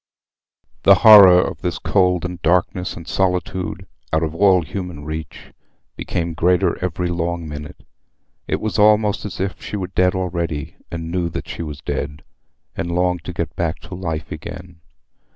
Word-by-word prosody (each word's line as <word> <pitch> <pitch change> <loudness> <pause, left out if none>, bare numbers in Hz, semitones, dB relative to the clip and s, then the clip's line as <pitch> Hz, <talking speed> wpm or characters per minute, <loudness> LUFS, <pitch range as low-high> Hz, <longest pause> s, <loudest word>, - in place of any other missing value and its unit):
The - - +7
horror 100 -5 +10
of - - -2
this 90 -3 -2
cold, 90 -3 +1
and 90 -1 -6
darkness, 90 +2 +1
and 85 -1 -10
solitude—out 90 -3 -2
of 80 -1 -2
all 95 0 +4
human 85 -2 -6
reach—became 80 +2 -7
greater 90 +2 +2
every 90 0 -2
long 85 -1 -2
minute. 75 0 -9 0.6
It - - -1
was 110 0 -2
almost 105 0 +3
as 105 - -6
if 95 +1 -3
she - - -6
were 95 - -3
dead 90 0 +1
already, 85 -5 -3
and 80 -1 -5
knew 85 -1 -1
that - - -6
she - - -6
was 75 -3 -6
dead, 70 +1 -4 0.5
and 85 - -3
longed 90 -1 0
to - - -4
get - - -4
back 85 -1 -1
to 95 - -11
life 80 -4 -4
again. 90 -2 -9
90 Hz, 155 wpm, -20 LUFS, 80-90 Hz, 0.6 s, horror